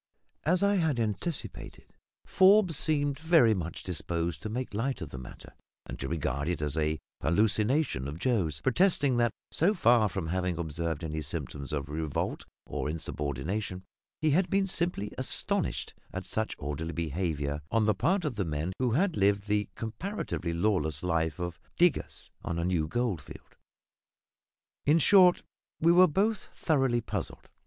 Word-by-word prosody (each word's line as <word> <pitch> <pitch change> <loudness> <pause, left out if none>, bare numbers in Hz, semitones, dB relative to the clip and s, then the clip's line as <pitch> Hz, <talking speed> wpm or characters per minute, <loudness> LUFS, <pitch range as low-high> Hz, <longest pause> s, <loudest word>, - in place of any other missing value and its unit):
As 180 +5 +3
I 200 0 +3
had 160 -8 +1
anticipated, 115 - -3 0.3
Forbes 190 -3 +5
seemed 145 -2 0
very 160 -8 +5
much 85 -4 -4
disposed 85 -1 -2
to 110 - -4
make 125 0 -4
light 125 +4 -1
of 80 -6 -6
the 65 - -7
matter, 65 - -11 0.3
and - - -8
to 65 - -3
regard 70 -3 -2
it 90 - -1
as 75 -2 -2
a 80 0 0 0.2
hallucination 105 - +1
of 75 +2 -6
Joe's; 90 - 0
protesting 140 -2 +3
that, 120 -2 +3 0.2
so 195 +7 +2
far 115 - +4
from 80 - -4
having 90 -1 -1
observed 80 0 -2
any 80 -1 -3
symptoms 70 -2 -5
of 75 -1 -2
revolt 75 0 -3 0.2
or - - -3
insubordination, 80 - -3 0.4
he 155 -1 +2
had 180 +5 +2
been 195 0 +2
simply 170 - -1
astonished - - 0 0.2
at 95 0 -5
such 110 +2 -2
orderly 75 +3 -4
behaviour 75 -2 -2
on 115 -1 +2
the 110 - +3
part 185 - +1
of 120 -8 -3
men 80 0 -2
who 125 -3 +1
had 180 +5 +2
lived 100 0 +2
the 105 0 0
comparatively 115 - -4
lawless 85 -5 0
life 80 -3 0
of 85 -1 -4 0.2
diggers 175 -2 +1
on 85 - -3
a 85 - -1
new 85 -4 +1
gold 115 -3 -1
field. - - -13 1.3
In 150 +3 +4
short, 180 +2 +6 0.4
we 165 +2 +5
were 180 +1 +7
both 200 +6 0
thoroughly 135 -7 +1
puzzled. 105 -5 -5
100 Hz, 155 wpm, -29 LUFS, -, 1.3 s, were